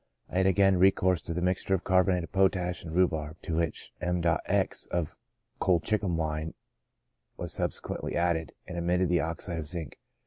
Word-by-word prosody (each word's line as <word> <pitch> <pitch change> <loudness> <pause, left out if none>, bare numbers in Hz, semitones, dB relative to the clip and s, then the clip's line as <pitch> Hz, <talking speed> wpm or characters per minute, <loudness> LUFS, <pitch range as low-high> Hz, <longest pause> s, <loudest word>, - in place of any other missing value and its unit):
I - - -2
had 95 0 +4
again 95 0 +4
recourse 95 -2 +4
to 85 - -4
the 90 - -1
mixture 95 +1 +1
of 95 - -4
carbonate 90 -1 +3
of - - -9
potash 95 -2 +1
and 80 - -7
rhubarb, 80 -3 +1
to 80 - -2
which 85 -2 -2
m.x 90 -2 0
of 85 -3 -2 0.4
colchicum 95 0 +1
wine 80 0 -2 0.8
were - - -4
subsequently - - -2
added, 85 -2 0
and 90 -1 -5
omitted 90 +1 +1
the 85 -1 +3
oxide 85 +1 -4
of 75 - -5
zinc. 80 0 -5
90 Hz, 165 wpm, -29 LUFS, 80-95 Hz, 0.8 s, had